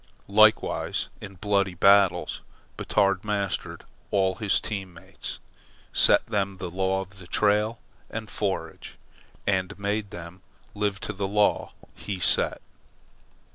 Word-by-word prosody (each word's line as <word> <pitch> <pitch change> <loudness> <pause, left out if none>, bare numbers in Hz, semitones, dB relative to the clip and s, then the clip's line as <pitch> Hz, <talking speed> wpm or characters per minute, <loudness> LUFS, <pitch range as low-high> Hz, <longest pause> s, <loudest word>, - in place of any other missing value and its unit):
Likewise, 110 +2 +3
in 100 -2 -9
bloody 100 -1 0
battles, 100 +1 +4 0.3
Batard 100 -1 +1
mastered 100 -2 -2 0.3
all 95 -2 +2
his 105 -2 +2
team 95 -5 -5
mates, 80 - -7 0.6
set - - +5
them 100 -3 -1
the 90 -2 -5
law 95 +1 0
of 95 -2 -11
trail 105 +2 +2 0.3
and 110 -1 -5
forage, 100 0 -4 0.5
and 95 0 0
made 100 +1 -2
them 85 +1 -9 0.3
live 100 -1 -1
to 105 - -4
the 100 0 -2
law 105 +1 +1 0.2
he 100 -2 -5
set. 90 - +1
100 Hz, 120 wpm, -26 LUFS, 95-105 Hz, 0.6 s, set